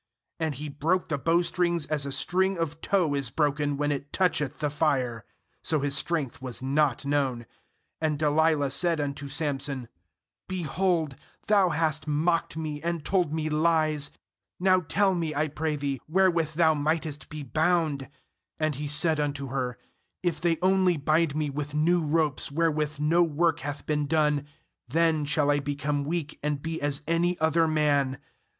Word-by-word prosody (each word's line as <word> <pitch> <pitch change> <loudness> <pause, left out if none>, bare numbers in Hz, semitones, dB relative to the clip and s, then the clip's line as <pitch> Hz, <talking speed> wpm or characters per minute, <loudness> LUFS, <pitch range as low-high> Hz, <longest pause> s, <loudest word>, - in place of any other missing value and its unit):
And 160 -3 -1
he 150 +4 -5
broke 160 +6 0
the 145 -3 -1
bowstrings 170 +1 +1
as 150 -2 -1
a - - -4
string 190 +6 +1
of 165 -1 -3
tow 180 -7 +1
is 140 -4 0
broken 145 +1 0
when 145 0 0
it 140 0 -4
toucheth 165 -7 +1
the 150 -2 -1
fire. 130 -7 0 0.4
So 155 - +2
his 140 -1 +1
strength 150 -7 -1
was 125 -2 -4
not 140 0 +1
known. 135 -4 0 0.6
10And 155 -2 +1
Delilah 150 -1 +2
said 170 +3 +2
unto 140 -1 -3
Samson: 140 -3 -1 0.6
'Behold, 170 -3 -1 0.3
thou 200 -3 +4
hast 155 -1 0
mocked 160 +2 0
me, 155 -2 -4
and 170 -1 -3
told 180 -6 +1
me 155 0 -1
lies; 155 -1 +2 0.5
now 185 0 +4
tell 195 +3 +1
me, 165 -3 -2
I 155 +2 +1
pray 155 +1 -2
thee, 140 -3 -3
where 190 +3 +4
with 160 -3 -1
thou 160 -1 +4
mightest 155 0 -2
be 155 -1 -6
bound/ 155 -1 0 0.5
"And 155 -1 0
he 145 +2 -4
said 150 +2 +2
unto 140 -2 -2
her: 125 -2 -2 0.5
'If 170 -4 -1
they 170 -2 +2
only 185 -2 +3
bind 155 +1 +1
me 155 -2 -1
with 145 +1 -5
new 170 +3 +3
ropes 150 -2 0
wherewith 155 -1 0
no 160 +4 +3
work 165 0 +2
hath 145 +1 -6
been 150 -1 0
done, 150 -1 +1 0.4
then 160 +2 +2
shall 145 0 +2
I 145 - +2
become 145 0 -2
weak, 155 -1 -3
and 150 -1 -1
be 165 +2 -4
as 145 0 -1
any 170 +2 +1
other 160 +1 +3
man.' 145 -4 +1
150 Hz, 165 wpm, -27 LUFS, 145-165 Hz, 0.6 s, thou